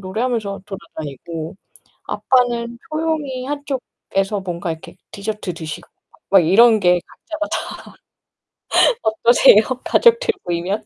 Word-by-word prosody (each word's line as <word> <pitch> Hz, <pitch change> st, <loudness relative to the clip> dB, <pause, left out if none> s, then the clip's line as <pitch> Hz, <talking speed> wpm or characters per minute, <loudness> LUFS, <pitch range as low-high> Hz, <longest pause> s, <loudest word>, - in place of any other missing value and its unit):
노래하면서 205 Hz, 0 st, -3 dB
돌아다니고 165 Hz, -4 st, -7 dB, 0.5 s
아빠는 240 Hz, -2 st, 0 dB
조용히 310 Hz, -5 st, -2 dB
한쪽에서 260 Hz, -8 st, -3 dB
뭔가 175 Hz, -2 st, -4 dB
이렇게 160 Hz, -, -13 dB
디저트 205 Hz, -3 st, -4 dB
드시고 160 Hz, -2 st, -7 dB, 0.2 s
막, -, -, -26 dB
막 195 Hz, -, +7 dB
이런 220 Hz, +5 st, +6 dB
게 180 Hz, -1 st, +4 dB
각자가 315 Hz, -1 st, -6 dB
다. -, -, -2 dB, 1.5 s
어떠세요? 220 Hz, 0 st, +5 dB, 0.2 s
가족들 470 Hz, 0 st, +4 dB, 0.2 s
모이면? 180 Hz, +5 st, -2 dB
215 Hz, 275 characters per minute, -19 LUFS, 180-255 Hz, 1.5 s, 막